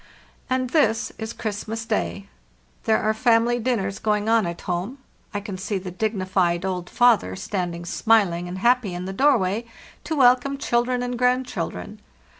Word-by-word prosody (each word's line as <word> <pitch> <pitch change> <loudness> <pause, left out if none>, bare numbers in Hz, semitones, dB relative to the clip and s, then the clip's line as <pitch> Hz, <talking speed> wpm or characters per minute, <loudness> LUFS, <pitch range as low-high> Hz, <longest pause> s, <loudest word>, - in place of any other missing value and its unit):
"And 255 -1 0
this 280 -8 +2
is 220 0 -4
Christmas 220 +1 -4
day! 90 - -2 0.3
| 60 0 -37
There 220 -1 +4
are 215 0 +1
family 235 +1 +3
din 245 +1 +1
ners 195 +2 -4
going 210 -1 0
on 225 -4 +3
at 170 0 -6
home. 180 +9 -3 0.3
I 205 - -2
can 200 -2 -7
see 200 +2 -2
the 185 -1 -6
dignified 185 -3 0
old 180 -2 -3
father 230 - +3
standing 175 - -4
smiling 180 -3 +2
and 180 +1 -5
happy 235 -3 +2
in 180 +1 -5
the 190 - -4
doorway 225 -4 +2 0.4
to 320 - -2
welcome 255 +1 +4
children 245 -2 0
and 245 -1 -3
grandchildren. 245 -5 -1
215 Hz, 165 wpm, -23 LUFS, 185-240 Hz, 0.4 s, There